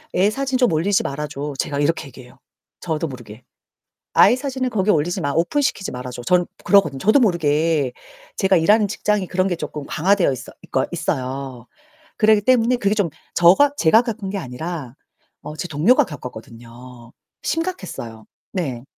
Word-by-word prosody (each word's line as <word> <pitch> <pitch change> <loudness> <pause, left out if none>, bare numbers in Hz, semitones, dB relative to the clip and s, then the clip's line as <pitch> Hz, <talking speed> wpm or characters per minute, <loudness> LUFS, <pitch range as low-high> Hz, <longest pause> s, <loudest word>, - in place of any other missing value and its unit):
"애 190 +3 +4
사진 270 +3 -1
좀 250 -6 +3
올리지 185 +6 +1
말아 150 +2 -4
줘." 145 0 -5
제가 140 -1 -2
이렇게 155 0 0
얘기해요. 125 -2 -15 0.4
저도 160 -1 -2
모르게. 120 -4 -11 0.7
"아이 245 - +6
사진을 260 -1 -3
거기 210 -3 +1
올리지 175 +2 +1
마, 145 -4 -1
오픈 175 - +1
시키지 200 -8 -1
말아 125 0 -6
줘." 120 0 -8
전 180 +7 +2 0.2
그러거든요 195 -9 +3
저도 215 - +4
모르게. 160 - +1 0.4
제가 190 -2 +3
일하는 205 +5 +4
직장이 210 -1 -1
그런 185 +1 0
게 175 - -1
쪼끔 150 -3 -6
강화되어 180 0 +2
있어 130 - -8
있거 130 - -1
있어요. 135 -6 -4 0.5
그러기 215 -1 +4
때문에 250 +1 +3
그게 205 -3 0
좀 205 -6 0 0.2
저가 195 +12 +5
제가 220 - +5
겪은 220 -5 -5
게 200 - -3
아니라 145 -2 -6 0.5
어 150 - -7
제 175 - -5
동료가 155 - +3
겪었거든요. 120 -2 -11 0.3
심각했어요. 185 - -4 0.3
네. 135 -10 -3
170 Hz, 355 characters per minute, -21 LUFS, 135-205 Hz, 0.7 s, 아이